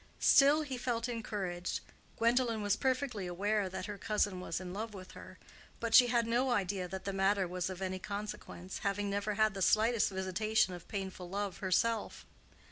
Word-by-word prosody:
Still 285 +3 +6
he 265 -4 -5
felt 235 -1 -1
encouraged. 200 -7 -3 0.4
Gwendolen 230 -1 +2
was 205 0 +2
perfectly 255 -6 -1
aware 200 +3 0
that 185 0 -5
her 205 -1 -6
cousin 205 -4 0
was 175 -2 -3
in 180 -1 -7
love 215 +1 -5
with 185 -1 -10
her; - - -12 0.4
but 230 -1 -2
she 250 +1 +9
had 235 -1 +2
no 240 +3 +1
idea 195 -5 0
that 190 +1 -7
the 195 - -2
matter 195 0 +2
was 180 +1 -3
of 185 0 -5
any 185 0 -3
consequence, 200 -2 -6
having 200 0 -1
never 205 +1 -1
had 215 0 +3
the 195 - -5
slightest 220 +4 +3
visitation 190 +1 +1
of 175 - -9
painful 190 -3 -5
love 200 0 -3
herself. 215 +4 0
205 Hz, 180 wpm, -33 LUFS, 190-230 Hz, 0.4 s, she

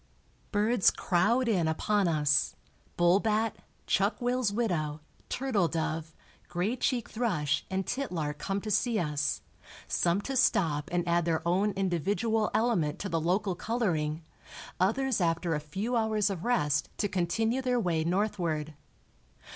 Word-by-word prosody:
Birds 215 +1 +3
crowd 225 +8 +1
in 185 -8 +2
upon 195 +5 +1
us, 150 -3 +2 0.4
bull 175 +2 +5
bat, 220 0 0 0.3
chuck 200 +3 +1
wills 245 -3 +1
widow, 170 -9 -1 0.3
turtle 245 -9 +1
dove, 160 0 -3 0.4
gray 185 +7 -1
cheeked 250 -2 -1
thrush 175 -12 0
and 190 0 -1
titlark 165 - -3
come 195 +5 -2
to 215 +1 -5
see 235 +2 +2
us, 150 -5 -1 0.5
some 175 +2 +1
to 270 +6 -4
stop 160 - +2
and 175 0 0
add 170 0 +2
their 165 0 0
own 190 +4 +2
individual 200 +4 0
element 185 -11 +1
to 200 - -4
the 165 -2 0
local 190 +4 +1
coloring, 170 -8 -1 0.6
others 225 +5 +1
after 170 0 +1
a 150 - 0
few 195 +11 -3
hours 215 -3 +1
of 185 -3 -5
rest 150 - +1
to 205 - +1
continue 205 +7 0
their 250 -1 +1
way 170 -6 0
northward. 170 -4 -1
190 Hz, 140 wpm, -29 LUFS, 165-225 Hz, 0.6 s, bull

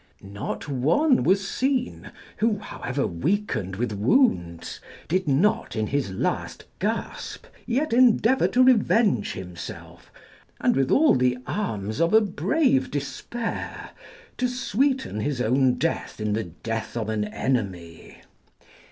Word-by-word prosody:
Not 100 +6 -6
one 160 - +2
was 195 +2 +2
seen 260 -1 -1 0.3
who, 220 -1 +1
however 140 -8 -3
weakened 110 - -1
with 120 +3 -2
wounds, 100 - +1 0.3
did 185 +1 0
not 210 - +1
in 110 -1 0
his 135 -1 -1
last 95 - -3
gasp 220 +4 -3 0.2
yet 265 +3 0
endeavour 250 +1 +4
to 255 - +3
revenge 225 - +3
himself, 90 -2 -9 0.5
and - - +2
with 135 0 +1
all 310 +2 +5
the 125 0 +2
arms 110 - -3
of 170 +5 +3
a 220 - +7
brave 255 - +1
despair, 145 - -5 0.5
to 250 - +1
sweeten 250 - 0
his 140 +2 -2
own 125 +2 +3
death 165 -6 -2
in 105 -1 -1
the 110 0 -1
death 115 +8 -5
of 110 -2 -2
an 110 -1 -1
enemy. 100 -8 -4
145 Hz, 125 wpm, -25 LUFS, -, 0.5 s, a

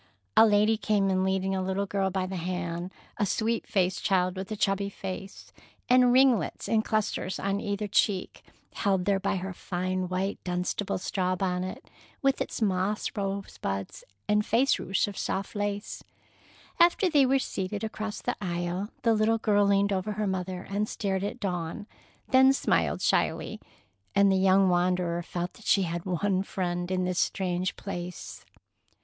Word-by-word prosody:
A 225 - +8
lady 210 +1 +4
came 205 -2 +1
in 185 0 +1
leading 190 0 0
a 190 - 0
little 190 +2 -1
girl 195 -1 0
by 190 0 -1
the 190 +1 -5
hand, 175 0 -3 0.3
a 205 - +1
sweet 225 +4 -1
faced 185 -2 0
child 185 -2 +2
with 190 +2 -6
a - - -1
chubby 200 -1 0
face, 195 0 -8 0.3
and 250 0 +5
ringlets 255 -3 +3
in 220 -1 +3
clusters 215 -4 -1
on 195 +1 -1
either 205 0 -2
cheek, 195 -1 0 0.3
held 190 -3 0
there 200 -1 +2
by 195 - 0
her 190 +1 -4
fine 185 0 -3
white, 190 +2 -2
dunstable 180 +2 -2
straw 185 0 -1
bonnet, 185 0 -3 0.3
with 275 -1 +1
its - - -2
moss 195 +1 0
rosebuds 195 - -4 0.2
and 210 0 +3
face 240 +6 +3
ruche 195 - 0
of 200 - -6
soft 195 +2 -3
lace. 205 0 -3 0.8
After 345 +3 +5
they 290 -6 +4
were 270 +1 +4
seated, 200 -4 -3
across 215 -1 -4
the - - -1
aisle, 175 +2 -2
the 230 - +4
little 220 +1 +2
girl 205 -2 +3
leaned 200 0 +3
over 195 +3 -1
her 210 +1 -2
mother 185 -1 -3
and 205 +2 -1
stared 195 -2 -2
at 205 - -4
Dawn, 180 -1 -3 0.4
then 265 +1 +6
smiled - - +1
shyly, - - +1 0.6
and 200 0 +5
the - - +3
young 190 0 +4
wanderer 175 -1 +1
felt 175 +1 -4
that 220 - -16
she 195 - +4
had 170 +1 -4
one 185 +1 +1
friend 175 -2 -3
in 185 -1 0
this 180 -1 -1
strange 185 -1 0
place. 180 -3 -7
195 Hz, 165 wpm, -28 LUFS, 185-210 Hz, 0.8 s, A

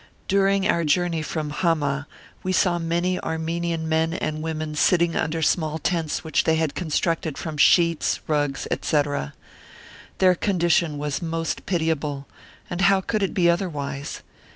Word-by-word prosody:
During 195 0 +2
our 170 - +2
journey 165 +1 +1
from 155 -1 -3
Hamah 150 -4 0 0.3
we 185 - -2
saw 180 -1 +2
many 170 +2 0
Armenian 165 0 -2
men 160 +1 +1
and 155 -2 -3
women, 155 -1 -3
sitting 170 +2 +2
under 160 0 -1
small 155 0 +1
tents 165 -1 -1
which 160 - +1
they 160 - +2
had 160 -2 0
constructed 165 -2 -1
from 160 -2 -5
sheets, 170 +2 +3
rugs, 145 -3 -1
etc. 145 - -1 0.8
Their 185 -1 +5
condition 170 -4 +1
was 145 -1 -3
most 165 -1 -3
pitiable, 155 -5 -1 0.4
and 175 +1 -4
how 195 0 +5
could 210 +3 -2
it 195 - -1
be 175 -2 +3
otherwise? 150 -6 -2
165 Hz, 145 wpm, -24 LUFS, 150-175 Hz, 0.8 s, Their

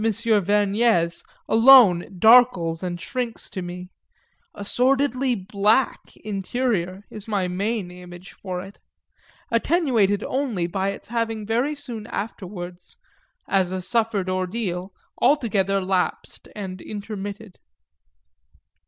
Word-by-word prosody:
Vergnès 210 -4 +2 0.2
alone 225 -7 +6
darkles 220 -7 +5
and 175 -2 -4
shrinks 245 +4 -5
to 190 - -5
me 180 +1 -7 0.6
a 205 - -7
sordidly 260 +1 +1
black 210 +5 +1 0.2
interior 200 -2 -2
is 215 -1 -7
my 200 -4 0
main 195 +1 -2
image 180 +1 -11
for 180 -2 -5
it; 195 +1 -13 0.7
attenuated 230 - +2
only 250 -10 -1
by 190 +3 -1
its 195 - -8
having 225 -2 -2
very 245 +7 0
soon 235 -7 -7
afterwards, 180 -5 -7 0.5
as 190 -2 +1
a 185 - -2
suffered 215 0 0
ordeal, 185 0 -3 0.3
altogether 205 -9 +2
lapsed 185 -1 -2
and 190 -3 -6
intermitted. 205 -1 -7
205 Hz, 105 wpm, -23 LUFS, 185-230 Hz, 0.7 s, alone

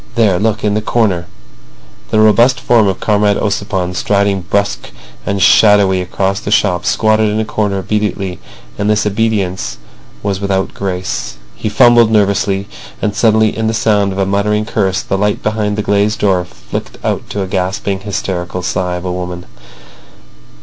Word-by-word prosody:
There. 105 -6 +3
Look. 110 +1 -1
In 105 -1 +1
that 105 0 -2
corner." 95 -8 +1 0.8
The 110 - +2
robust 115 +4 +4
form 115 -4 +3
of 95 - -1
Comrade 105 -1 +2
Ossipon, 95 -3 -2
striding 100 +1 +1
brusque 100 0 -1 0.4
and 100 -1 -1
shadowy 100 -1 +5
across 95 +2 -1
the 105 - -6
shop, 90 -4 +1
squatted 110 +2 +2
in 105 +1 -1
a 110 - 0
corner 105 -2 -1
obediently; 100 -2 -2 0.4
but 105 - -1
this 105 0 +2
obedience 100 - -1 0.5
was 100 -1 -2
without 95 -1 -1
grace. 90 -2 -4 0.2
He 110 - -3
fumbled 120 +1 +5
nervously—and 100 0 -1
suddenly 110 -1 +3
in 110 0 -1
the 110 - 0
sound 105 -3 +1
of 95 - -5
a 95 - +1
muttered 105 +2 0
curse 95 -3 -1
the 95 - -2
light 105 +1 0
behind 105 -1 -1
the 105 - -1
glazed 105 +1 +1
door 95 -4 +1
flicked - - -7
out - - -2
to 100 - -2
a - - -5
gasping, 95 +1 -2
hysterical 95 -3 -4
sigh 90 -1 -1
of 90 +1 -6
a 90 - -2
woman. 90 -1 -5
100 Hz, 165 wpm, -14 LUFS, 95-105 Hz, 0.8 s, shadowy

